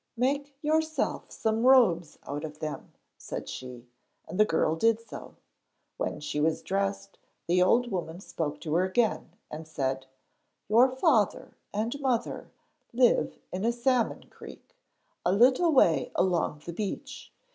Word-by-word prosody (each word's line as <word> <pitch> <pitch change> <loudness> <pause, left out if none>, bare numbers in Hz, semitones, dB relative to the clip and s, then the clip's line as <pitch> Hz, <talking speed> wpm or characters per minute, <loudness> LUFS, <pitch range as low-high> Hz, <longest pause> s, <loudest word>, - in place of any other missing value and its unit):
'Make 280 +3 -1
yourself 315 +1 0
some 220 0 -1
robes 210 - +4
out 145 +2 -5
of 150 -1 -7
them,' 155 -1 -6 0.3
said - - -6
she, 125 -1 -8 0.4
and 185 - -6
the 215 - +7
girl 160 -3 +1
did 225 +6 +2
so. 230 - -11 0.6
When - - -3
she 150 0 -3
was 160 +1 0
dressed, 100 0 -2 0.3
the 180 +1 +2
old 240 +6 +3
woman 175 -2 -4
spoke 150 -6 -4
to 155 - -3
her 175 +3 +3
again, 190 -2 0 0.2
and 155 +1 -7
said: 135 -3 -3 0.6
'Your 235 +5 +5
father 260 - +1 0.2
and 225 +7 -2
mother 250 -4 -1 0.4
live 245 0 +2
in 185 +2 -4
a 230 - +3
salmon 240 0 0
creek, - - -13 0.5
a 180 - +2
little 255 - +4
way 165 - +3
along 170 -5 0
the 170 - -5
beach. 220 - -6
195 Hz, 145 wpm, -28 LUFS, 155-245 Hz, 0.6 s, the